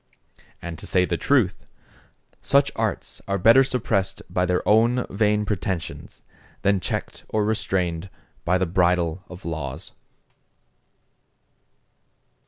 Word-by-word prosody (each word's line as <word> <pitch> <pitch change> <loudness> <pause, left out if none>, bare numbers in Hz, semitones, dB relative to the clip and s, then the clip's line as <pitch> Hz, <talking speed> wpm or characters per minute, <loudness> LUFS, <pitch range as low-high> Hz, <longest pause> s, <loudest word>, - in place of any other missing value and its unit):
And 85 -2 -6
to - - -9
say 90 -1 +3
the 85 - -1
truth, 100 -4 +1 0.7
such - - +3
arts - - -3
are 100 0 0
better 115 +8 +6
suppressed 110 -7 -1
by 90 0 +1
their 90 0 0
own 115 +4 +4
vain 105 +1 +1
pretensions, 95 -4 -4 0.4
than 100 0 +3
checked - - -4
or 105 -1 +1
restrained 95 -5 -1 0.3
by 90 +2 +2
the 95 - +1
bridle 90 0 +1
of 90 +1 -11
laws. 80 -1 -5
95 Hz, 115 wpm, -24 LUFS, 85-105 Hz, 0.7 s, better